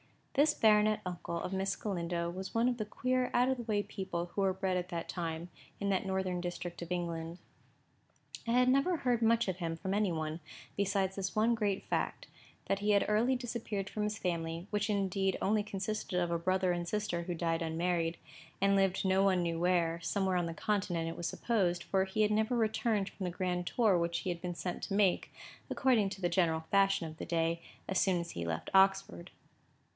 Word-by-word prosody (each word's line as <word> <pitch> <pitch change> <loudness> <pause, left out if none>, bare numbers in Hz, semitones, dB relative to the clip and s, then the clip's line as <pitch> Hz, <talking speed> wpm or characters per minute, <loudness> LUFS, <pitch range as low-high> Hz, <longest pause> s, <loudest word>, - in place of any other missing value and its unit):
This 295 +2 +4
baronet 215 0 +4
uncle 175 -1 -4
of 185 - -4
Miss 190 +1 0
Galindo 170 -4 -2
was 190 +3 -6
one 230 +2 +3
of 250 -1 0
the 215 - -2
queer, 255 +4 0
out 250 +1 +4
of 265 - +1
the 240 - -5
way 210 -3 0
people 175 -4 -4
who 200 - -3
were 190 -1 +3
bred 185 -1 -1
at 180 0 -3
that 170 -2 -4
time, 170 -1 -4 0.3
and 200 - -2
in - - +1
that 195 0 +1
northern 190 -2 -1
district 175 0 -5
of 170 0 -7
England. 170 -1 -3 1.1
I 245 +2 +4
never 275 +7 +3
heard 245 -5 +1
much 230 0 +3
of 185 -2 -1
him 165 -3 -2
from 190 +4 -3
any 205 -2 +2
one, 160 0 -3 0.4
besides 195 -1 0
this 190 -1 -3
one 220 +2 +3
great 205 -4 0
fact: - - -2 0.4
that 195 - +1
he 210 +1 +1
had 200 -1 +4
early 225 +5 +3
disappeared 225 -5 -4
from 210 - -2
his 210 +1 -1
family, 170 -3 -2
which 210 0 0
indeed 195 -2 +1
only 210 +2 +2
consisted 205 -1 -3
of 175 -1 0
a 170 - 0
brother 185 +1 +1
and 175 -1 -2
sister 190 -3 -1
who 175 0 -3
died 165 0 0
unmarried, 165 +1 0 0.4
and 200 +1 +3
lived 195 -1 +2
no 190 0 +3
one 190 -2 +3
knew 165 -1 -1
where,—somewhere 175 +2 +1
on 175 -1 0
the 165 - -4
Continent, 180 -4 -1
it 165 - -7
was 170 - -2
supposed, 185 -7 0
for 190 -1 +1
he 205 +3 +1
had 210 - +2
never 220 +3 +2
returned 220 -2 +1
from 190 - -6
the - - 0
grand 180 0 -2
tour 215 -7 +3
which 170 0 0
he 185 - -3
had 170 -1 -3
been 180 -1 -4
sent 180 0 -4
to 195 - -2
make, 200 -3 +2 0.4
according 235 -7 +3
to 195 0 -8
the 175 - +1
general 170 -3 +2
fashion 195 -3 +3
of 155 -1 -8
the - - -5
day, 165 0 0 0.3
as 190 - +1
soon 185 -3 +3
as 170 0 -5
he - - -7
had 85 - -2
left 80 0 -3
Oxford. 190 - +3
190 Hz, 210 wpm, -33 LUFS, 170-210 Hz, 1.1 s, This